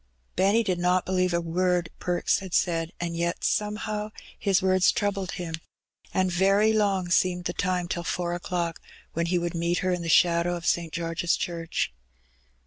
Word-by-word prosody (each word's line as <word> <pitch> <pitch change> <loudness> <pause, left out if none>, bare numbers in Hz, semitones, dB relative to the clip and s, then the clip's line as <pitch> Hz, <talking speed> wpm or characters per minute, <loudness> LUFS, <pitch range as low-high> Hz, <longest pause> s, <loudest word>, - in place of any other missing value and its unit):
Benny 200 +5 +3
did 185 -4 -1
not 180 +1 +2
believe 185 -1 +1
a 170 - +1
word 175 +1 0
Perks 175 -1 +1
had 190 -2 -4
said; 165 -2 +1
and 170 -1 -3
yet, 170 +1 -2
somehow, 210 0 -1 0.3
his 195 -2 +3
words 185 -1 +4
troubled 200 -2 -2
him, 170 -2 -5 0.6
and 185 -1 +1
very 195 +4 +3
long 195 -4 +1
seemed 180 -1 +2
the 175 - -1
time 180 -2 -1
till 175 0 -2
four 175 0 -2
o'clock, 175 -2 -3 0.3
when 170 +1 -1
he 180 +1 +1
would 175 0 -2
meet 170 +1 0
her 185 - +2
in 180 -1 -1
the 165 - -4
shadow 170 +1 +4
of 170 -1 -7
St. 170 -2 +1
George's 165 +1 -1
Church. 165 - -2
180 Hz, 175 wpm, -26 LUFS, 170-185 Hz, 0.6 s, words